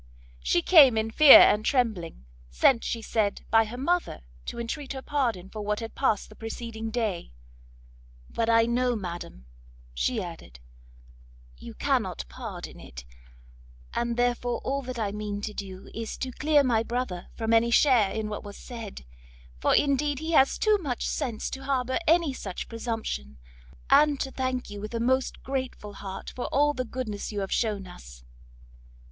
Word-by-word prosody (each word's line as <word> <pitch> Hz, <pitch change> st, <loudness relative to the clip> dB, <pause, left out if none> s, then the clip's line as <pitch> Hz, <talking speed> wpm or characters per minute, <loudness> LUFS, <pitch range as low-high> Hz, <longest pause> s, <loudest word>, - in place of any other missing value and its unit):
She 120 Hz, -, +1 dB
came 280 Hz, -10 st, +7 dB
in 220 Hz, 0 st, -1 dB
fear 300 Hz, +4 st, +10 dB
and 210 Hz, -, +5 dB
trembling, 215 Hz, -, -1 dB, 0.2 s
sent, 230 Hz, -, +3 dB
she 230 Hz, -1 st, -3 dB
said, 215 Hz, -3 st, -1 dB
by 225 Hz, 0 st, +5 dB
her 230 Hz, +3 st, -8 dB
mother, 345 Hz, -, -1 dB, 0.3 s
to -, -, -5 dB
entreat 270 Hz, +5 st, -4 dB
her 265 Hz, -, -6 dB
pardon 240 Hz, -11 st, -1 dB
for 215 Hz, +2 st, -7 dB
what 210 Hz, 0 st, -1 dB
had 225 Hz, -1 st, -6 dB
passed 220 Hz, -7 st, 0 dB
the 215 Hz, -, -14 dB
preceding 225 Hz, 0 st, -6 dB
day; 215 Hz, -, -3 dB, 0.9 s
"But 230 Hz, 0 st, -2 dB
I 230 Hz, 0 st, +5 dB
know, 245 Hz, +1 st, +1 dB
madam," 175 Hz, -, -7 dB, 0.5 s
she 230 Hz, -, 0 dB
added, 165 Hz, -, -8 dB, 1.0 s
"you -, -, -10 dB
cannot -, -, -1 dB
pardon 60 Hz, -, -8 dB
it, -, -, -11 dB, 0.9 s
and 235 Hz, 0 st, -1 dB
therefore 245 Hz, 0 st, 0 dB
all 275 Hz, +1 st, -1 dB
that 255 Hz, -2 st, -6 dB
I 210 Hz, -3 st, -1 dB
mean 205 Hz, 0 st, -4 dB
to 210 Hz, 0 st, -4 dB
do 190 Hz, -2 st, -8 dB
is 225 Hz, -1 st, -5 dB
to 260 Hz, -, -4 dB
clear 295 Hz, +2 st, +3 dB
my 235 Hz, -4 st, +2 dB
brother 230 Hz, -6 st, -3 dB
from 225 Hz, -1 st, -1 dB
any 230 Hz, +1 st, +4 dB
share 235 Hz, -5 st, +4 dB
in 220 Hz, +1 st, -3 dB
what 210 Hz, -1 st, -5 dB
was 205 Hz, -1 st, -9 dB
said, 225 Hz, -, -9 dB, 0.5 s
for -, -, +3 dB
indeed 285 Hz, 0 st, +2 dB
he 315 Hz, +4 st, -4 dB
has 270 Hz, -4 st, +4 dB
too 430 Hz, -1 st, +3 dB
much 270 Hz, -9 st, -3 dB
sense 230 Hz, -5 st, -3 dB
to 270 Hz, 0 st, -7 dB
harbour 260 Hz, -1 st, 0 dB
any 330 Hz, -3 st, +3 dB
such 195 Hz, -7 st, -6 dB
presumption; 225 Hz, -, -4 dB, 0.5 s
and 295 Hz, -2 st, +5 dB
to 270 Hz, -, -3 dB
thank 255 Hz, -3 st, -3 dB
you 205 Hz, 0 st, -7 dB
with 215 Hz, +3 st, -6 dB
a -, -, -1 dB
most 260 Hz, +3 st, 0 dB
grateful 260 Hz, -6 st, -4 dB
heart 195 Hz, -1 st, -7 dB
for 250 Hz, -, -4 dB
all 295 Hz, +1 st, +2 dB
the 255 Hz, -2 st, -3 dB
goodness 225 Hz, -5 st, -5 dB
you 205 Hz, -1 st, -3 dB
have 195 Hz, -, -4 dB
shewn 210 Hz, -4 st, 0 dB
us." -, -, -13 dB
230 Hz, 170 wpm, -27 LUFS, 205-260 Hz, 1.0 s, fear